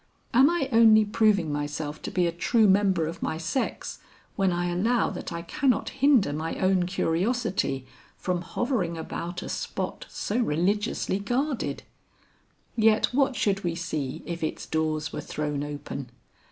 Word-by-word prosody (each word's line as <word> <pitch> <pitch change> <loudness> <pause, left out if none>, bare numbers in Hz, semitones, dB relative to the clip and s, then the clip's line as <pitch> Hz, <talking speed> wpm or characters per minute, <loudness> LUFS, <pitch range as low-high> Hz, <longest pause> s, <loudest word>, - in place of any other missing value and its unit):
Am 265 +4 +6
I 340 -6 0
only 220 -2 +7
proving 205 -6 +2
myself 145 +1 -4
to - - -4
be 180 -1 +1
a 170 - +1
true 215 +6 +3
member 190 -4 +3
of 165 +2 -6
my 160 - -2
sex 170 +11 -3 0.4
when 195 -2 +2
I 175 0 0
allow 225 +8 +1
that - - -6
I 170 0 -4
cannot 255 +9 +1
hinder 265 - +3
my 160 +2 -3
own 185 -1 +2
curiosity 185 - 0 0.3
from 180 -1 -1
hovering 180 -2 -1
about 175 +2 -5
a - - -6
spot - - -4
so 220 +4 -2
religiously 200 +2 0
guarded? 250 +6 -1 0.9
Yet 220 +1 +3
what 275 0 +2
should 200 -2 0
we 170 -2 -1
see 155 -4 -4
if 170 -1 -5
its 155 - -3
doors 155 -1 -1
were - - -3
thrown 150 -1 -3
open? 145 -3 -6
185 Hz, 155 wpm, -27 LUFS, 160-225 Hz, 0.9 s, only